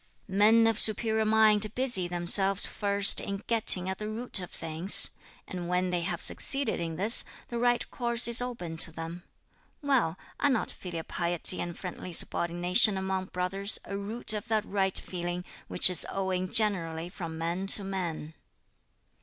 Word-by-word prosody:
"Men 215 Hz, +4 st, +2 dB
of 225 Hz, -1 st, +2 dB
superior 220 Hz, 0 st, +4 dB
mind 215 Hz, -1 st, +2 dB
busy 245 Hz, -9 st, +1 dB
themselves 185 Hz, +3 st, +1 dB
first 200 Hz, -1 st, +2 dB
in 200 Hz, 0 st, -7 dB
getting 210 Hz, -5 st, +8 dB
at 190 Hz, 0 st, -5 dB
the 210 Hz, -, -6 dB
root 230 Hz, 0 st, -1 dB
of 180 Hz, -, -7 dB
things; 165 Hz, +4 st, 0 dB, 0.4 s
and 180 Hz, -2 st, -8 dB
when 180 Hz, 0 st, -2 dB
they 175 Hz, -1 st, -2 dB
have 170 Hz, -, -4 dB
succeeded 275 Hz, 0 st, -2 dB
in 165 Hz, -1 st, -5 dB
this 205 Hz, +7 st, +2 dB, 0.3 s
the 235 Hz, -, -5 dB
right 245 Hz, 0 st, -1 dB
course 235 Hz, -1 st, -1 dB
is 235 Hz, +1 st, +5 dB
open 205 Hz, -10 st, -7 dB
to 160 Hz, -, +1 dB
them. 165 Hz, +2 st, -9 dB, 0.6 s
Well, 245 Hz, -, -1 dB, 0.2 s
are 285 Hz, -, +1 dB
not 255 Hz, -5 st, -2 dB
filial 170 Hz, -3 st, -8 dB
piety 175 Hz, +1 st, +1 dB
and 175 Hz, -1 st, -7 dB
friendly 180 Hz, -1 st, -9 dB
subordination 175 Hz, +6 st, +2 dB
among 190 Hz, 0 st, -4 dB
brothers 195 Hz, +3 st, -2 dB
a 200 Hz, -, -7 dB
root 215 Hz, +3 st, -3 dB
of 210 Hz, +1 st, -6 dB
that 215 Hz, -2 st, -2 dB
right 190 Hz, -1 st, -2 dB
feeling 175 Hz, 0 st, -6 dB, 0.2 s
which -, -, +5 dB
is 180 Hz, -3 st, 0 dB
owing 185 Hz, -1 st, -4 dB
generally 170 Hz, -6 st, 0 dB
from 170 Hz, -3 st, -9 dB
man 170 Hz, +4 st, -5 dB
to 200 Hz, -, +5 dB
man?" 175 Hz, -5 st, -6 dB
190 Hz, 160 wpm, -27 LUFS, 175-215 Hz, 0.6 s, getting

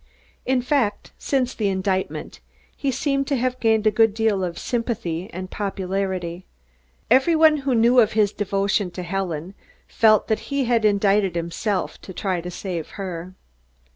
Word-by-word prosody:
In 255 Hz, -1 st, +2 dB
fact, 250 Hz, -6 st, 0 dB
since 260 Hz, -2 st, 0 dB
the 215 Hz, -, -1 dB
indictment, 190 Hz, 0 st, -2 dB, 0.4 s
he 280 Hz, -, -2 dB
seemed 275 Hz, +1 st, 0 dB
to 285 Hz, -, +1 dB
have 255 Hz, 0 st, -1 dB
gained 220 Hz, -2 st, +2 dB
a 215 Hz, -, +5 dB
good 225 Hz, -1 st, +3 dB
deal 220 Hz, -4 st, +1 dB
of 170 Hz, -2 st, -3 dB
sympathy 220 Hz, -7 st, -3 dB
and 185 Hz, +1 st, -7 dB
popularity. 190 Hz, -3 st, -3 dB, 0.6 s
Every 265 Hz, +7 st, +5 dB
one 315 Hz, -1 st, +5 dB
who 270 Hz, -3 st, 0 dB
knew 235 Hz, +2 st, +5 dB
of 220 Hz, -3 st, +4 dB
his 215 Hz, -2 st, +2 dB
devotion 200 Hz, -1 st, 0 dB
to 180 Hz, -, -3 dB
Helen 180 Hz, -1 st, -3 dB, 0.3 s
felt 215 Hz, -2 st, +4 dB
that 220 Hz, -, +1 dB
he 280 Hz, -2 st, 0 dB
had 230 Hz, -2 st, +2 dB
indicted 200 Hz, -2 st, +2 dB
himself 170 Hz, +4 st, -2 dB
to 190 Hz, -, -10 dB
try 185 Hz, -1 st, -2 dB
to 175 Hz, -, -6 dB
save 175 Hz, -3 st, -5 dB
her. 185 Hz, -2 st, -6 dB
205 Hz, 160 wpm, -23 LUFS, 185-240 Hz, 0.6 s, a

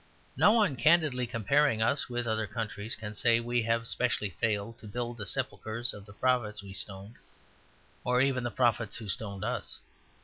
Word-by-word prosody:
No 210 Hz, -, +6 dB
one 205 Hz, -, +3 dB
candidly 150 Hz, -3 st, +3 dB
comparing 125 Hz, +2 st, +2 dB
us 135 Hz, +4 st, +1 dB
with 120 Hz, 0 st, -2 dB
other 110 Hz, -1 st, 0 dB
countries 110 Hz, -1 st, -4 dB
can 105 Hz, -1 st, -7 dB
say 115 Hz, +2 st, +3 dB
we 120 Hz, +1 st, 0 dB
have 115 Hz, 0 st, 0 dB
specially 115 Hz, -6 st, 0 dB
failed 110 Hz, +5 st, -2 dB
to 110 Hz, -, -11 dB
build 120 Hz, +2 st, -4 dB
the 100 Hz, -2 st, -5 dB
sepulchres 115 Hz, +3 st, -1 dB
of 105 Hz, 0 st, -11 dB
the 100 Hz, -, -12 dB
prophets 110 Hz, -3 st, 0 dB
we 100 Hz, -1 st, -9 dB
stoned, 100 Hz, +3 st, -6 dB, 0.9 s
or 125 Hz, 0 st, +2 dB
even 130 Hz, -1 st, +2 dB
the 120 Hz, -, -1 dB
prophets 115 Hz, -2 st, +1 dB
who 115 Hz, -2 st, -8 dB
stoned 100 Hz, 0 st, -4 dB
us. 120 Hz, -2 st, -3 dB
115 Hz, 175 wpm, -30 LUFS, 105-125 Hz, 0.9 s, No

